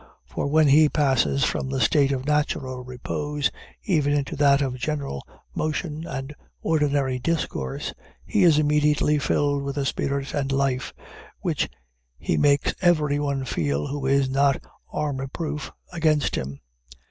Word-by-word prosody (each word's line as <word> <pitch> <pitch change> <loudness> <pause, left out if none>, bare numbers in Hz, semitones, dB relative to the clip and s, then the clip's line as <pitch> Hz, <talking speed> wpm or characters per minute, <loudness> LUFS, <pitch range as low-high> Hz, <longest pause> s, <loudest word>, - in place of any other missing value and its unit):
For 65 - -3
when 155 +1 +4
he 150 +2 +6
passes 135 -2 +2
from 135 - 0
the 135 0 -1
state 140 +4 +3
of 130 -1 -2
natural 140 -4 -1
repose, 140 +2 -2 0.3
even 150 -7 +2
into 145 +2 -1
that 140 -1 +5
of 130 -3 -1
gentle 140 - -3 0.3
motion 155 +1 -3
and 135 +2 -5 0.3
ordinary 145 -4 +1
discourse, 125 - -2 0.3
he - - +1
is 165 -4 +6
immediately 150 0 +3
filled 145 0 +1
with 140 0 -4
a 140 - 0
spirit 140 +1 -2
and 140 -1 -1
life, 135 -1 0 0.5
which - - 0 0.5
he - - -1
makes 140 - +3
everyone 145 -5 +2
feel 75 - -1
who 140 -1 -3
is 135 0 +3
not 135 +1 +2 0.3
armor 135 -3 -2
proof 150 +1 -4 0.2
against 155 -3 +2
him. 70 +1 -4
140 Hz, 140 wpm, -24 LUFS, 135-150 Hz, 0.5 s, he